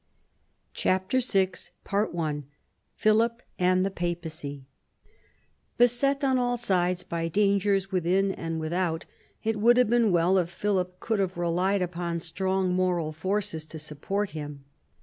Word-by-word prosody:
CHAPTER 190 +7 +1
VI 195 -7 +1 1.4
PHILIP 230 +3 +2 0.2
AND 185 +1 +3
THE 195 - -1
PAPACY 160 -6 -4 1.1
Beset 275 +4 +3
on 265 -2 +3
all 245 0 +1
sides 180 -5 +1
by 165 -1 -2
dangers 195 +1 +2
within 190 +2 +2
and 165 -3 -4
without, 165 +1 -1 0.4
it 220 -1 0
would 240 +3 +5
have 250 -3 +4
been 235 -3 +4
well 180 +2 +4
if 175 -2 -1
Philip 180 -1 -1
could 220 -3 -1
have 185 -2 -1
relied 180 +3 +1
upon 170 -1 -3
strong 185 +2 -1
moral 180 -4 +1
forces 185 +1 -2
to 160 +1 -9
support 160 +7 -3
him. 145 -2 -7
185 Hz, 130 wpm, -27 LUFS, 170-205 Hz, 1.4 s, would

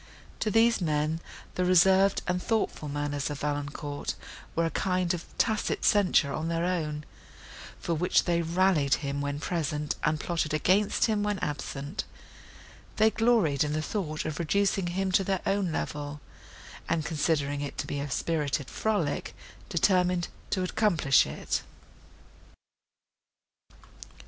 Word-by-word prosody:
To 215 - 0
these 225 +1 +4
men 155 0 0 0.3
the 180 - 0
reserved 190 +2 +5
and 180 0 0
thoughtful 215 -9 -1
manners 145 -1 -2
of 145 -2 -5
Valancourt 145 0 -3 0.4
were 165 - +2
a 165 - -1
kind 185 +1 0
of 170 -1 -5
tacit 220 -2 0
censure 180 -8 +4
on 155 - -2
their 165 +1 0
own, 155 -4 -2 0.8
for 170 - -2
which 180 +3 +2
they 170 -1 +1
rallied 165 -4 +3
him 140 0 -2
when 145 0 -2
present, 150 -3 -2
and 150 0 +1
plotted 155 -1 -1
against 190 +6 +3
him 215 -2 +1
when 210 -1 0
absent; 145 +1 -4 0.9
they 220 +1 +4
gloried 220 - +3
in 150 0 -2
the 155 - 0
thought 155 -5 -3
of 155 0 -3
reducing 195 +2 +1
him 190 +2 -1
to 195 - +3
their 190 -1 -1
own 195 -3 +1
level, 145 -1 -4 0.7
and, 160 -2 0
considering 145 -2 0
it 145 - -5
to - - -2
be 145 - -3
a 140 +1 -3
spirited 145 -2 -1
frolic, 200 -10 -1 0.3
determined 180 -1 +2 0.2
to 185 - 0
accomplish 180 -8 +3
it. - - -2
165 Hz, 140 wpm, -28 LUFS, 150-190 Hz, 0.9 s, reserved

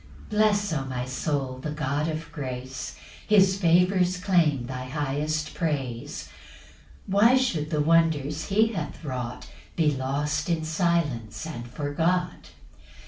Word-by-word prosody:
2 - - -3
Bless, 205 -3 +3
O 140 -3 -1
my 125 -1 -3
soul, 130 -1 -2
the 150 - -4
God 150 0 -1
of 160 +1 -4
grace; 130 -3 -5 0.3
His 195 -3 +5
favours 180 +1 +3
claim 170 -9 +2
thy 130 0 -5
highest 150 +3 -2
praise; 135 -8 -3 0.8
Why 210 +6 +5
should 170 - 0
the 150 -2 +1
wonders 155 -2 +2
he 220 +3 +3
hath 160 -3 -5
wrought 125 -3 -5 0.3
Be 155 -3 +3
lost 145 +4 -1
in 165 -2 0
silence 155 - 0
and 120 -7 -6
forgot? 165 +6 -1
150 Hz, 130 wpm, -26 LUFS, 135-175 Hz, 0.8 s, His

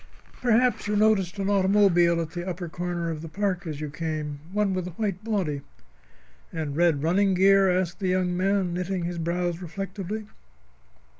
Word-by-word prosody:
Perhaps 245 -1 +2
you 210 - 0
noticed 205 -3 +2
an 195 -1 -1
automobile 190 -4 +4
at 165 -1 -3
the 175 +1 -4
upper 175 0 -4
corner 175 0 -3
of 155 -1 -5
the 165 - -7
park 190 +1 -2
as 150 -2 -5
you 150 -1 -5
came. 155 -2 -4
One 205 -1 +1
with 185 -1 -2
a 175 - -10
white 205 -3 -2
body." 185 -11 -1 0.9
"And 155 -4 -4
red 165 -3 +2
running 190 +4 +3
gear?" 195 +1 +5
asked 180 -1 0
the 190 - -1
young 180 -1 +1
man, 190 -1 +1
knitting 180 0 -2
his 175 0 -3
brows 175 +1 -1
reflectively. 195 +4 -5
180 Hz, 170 wpm, -26 LUFS, 170-195 Hz, 0.9 s, gear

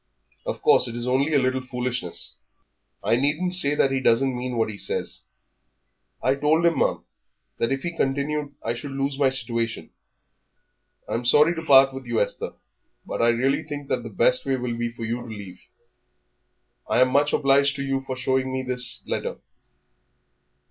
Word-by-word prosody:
"Of - - -4
course - - +5
it 120 - -6
is 120 0 -3
only 135 +4 +1
a - - +6
little 130 -1 +1
foolishness. 125 -7 -4 0.7
I 115 - +2
needn't 150 +7 0
say 145 -6 +4
that 135 - +2
he 135 - +1
doesn't 130 +1 +2
mean 125 0 -4
what 110 -1 +1
he - - -8
says." - - -1 1.0
"I 130 - +3
told 150 +4 +2
him, 170 -1 +3
ma'am, - - 0 0.6
that 115 - 0
if 135 0 -2
he 170 -1 -4
continued 145 +1 -1
I 115 - -1
should 135 +3 -7
lose 135 0 -2
my 135 -2 +4
situation." 115 -3 -3 1.2
"I'm 115 - -2
sorry 150 +7 +5
to 165 - -5
part 135 -3 +6
with 135 -2 -8
you, 120 -1 0
Esther, 100 - -2 0.5
but - - -3
I 115 - +4
really 130 +4 +1
think 145 -2 -7
that - - 0
the 115 - -8
best 120 +4 +3
way 135 -1 0
will 125 -1 -3
be 120 0 -2
for 115 -1 -7
you 120 +2 -3
to 120 - -10
leave. 100 -5 -9 1.3
I - - +2
am 130 - +5
much 145 +2 +3
obliged 140 0 +3
to 140 - -3
you 135 0 -1
for 135 -1 -5
showing 130 0 0
me 130 0 -2
this 125 -1 0
letter. - - -3
130 Hz, 185 wpm, -24 LUFS, 120-140 Hz, 1.3 s, a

